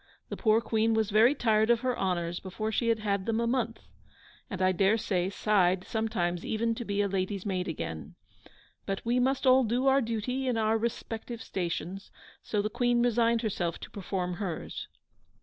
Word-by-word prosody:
The - - -4
poor 220 0 +3
Queen 225 0 +1
was 220 -1 +1
very 225 +7 +5
tired 220 -4 +2
of 235 -1 +4
her 255 -1 0
honours 175 -2 -1
before 215 +4 -4
she 230 +2 0
had 230 -1 +3
had 200 -2 -1
them 225 0 +1
a 235 - +1
month, 235 -1 -1 0.7
and 190 -5 -5
I 185 0 +3
dare 195 +4 +3
say 185 -4 -1
sighed 190 -3 +2
sometimes 195 -6 -1
even 230 +1 0
to 235 - -5
be 205 -2 -1
a - - +1
lady's 195 0 -2
maid 185 -2 -1
again. 80 - -5 0.7
But 195 +2 -3
we 240 +2 +2
must 265 +2 +1
all 260 0 +6
do 245 +3 0
our 270 0 +5
duty 245 +3 -2
in 245 -2 +1
our 220 0 +2
respective 230 0 -4
stations, 185 +1 -4 0.3
so 210 -2 -1
the - - +1
Queen 240 0 +2
resigned 235 -1 +2
herself 175 -6 -1
to - - -9
perform 180 -3 -3
hers. 185 -6 -5
220 Hz, 185 wpm, -29 LUFS, 190-235 Hz, 0.7 s, all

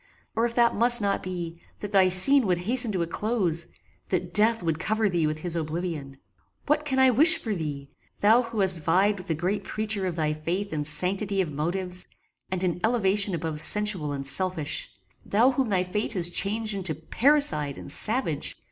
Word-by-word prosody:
or, 225 +1 0
if 235 - -10
that 235 -1 +2
must 240 +2 +5
not 200 -2 -2
be, 170 -2 -8 0.2
that 205 - -8
thy 190 -2 +3
scene 235 +7 +7
would 180 -2 0
hasten 235 +6 -1
to 185 -4 -2
a - - -3
close! 175 -3 -3 0.4
that 175 - -4
death 220 -1 +5
would 165 -2 -3
cover 220 +4 -1
thee 170 -5 -1
with 155 0 -5
his 175 -1 -2
oblivion! 155 -4 -6 0.5
What 300 +1 -1
can 265 -3 -3
I 265 -1 +4
wish 320 +8 +8
for 225 -9 -5
thee? 145 -6 -6 0.3
Thou 220 +4 +3
who 230 -3 -5
hast 185 -3 +4
vied 190 +6 0
with 180 - -12
the 165 - -2
great 180 +6 -3
preacher 215 -3 -3
of 175 - -5
thy 155 -2 -2
faith 175 +6 -5
in 150 -1 -4
sanctity 190 +6 0
of 175 -5 -2
motives, 180 +5 -3 0.4
and 185 0 -3
in 180 -1 -2
elevation 205 -4 +1
above 160 -1 -3
sensual 205 -8 +4
and 140 -1 -6
selfish! 165 0 -2 0.3
Thou 235 +6 +1
whom 260 -2 -2
thy 185 -3 0
fate 210 +5 -4
has 175 -3 +1
changed 215 +4 -1
into 185 -5 -3
paricide 160 - 0
and 140 - -10
savage! 210 - -1
190 Hz, 190 wpm, -24 LUFS, 165-220 Hz, 0.5 s, wish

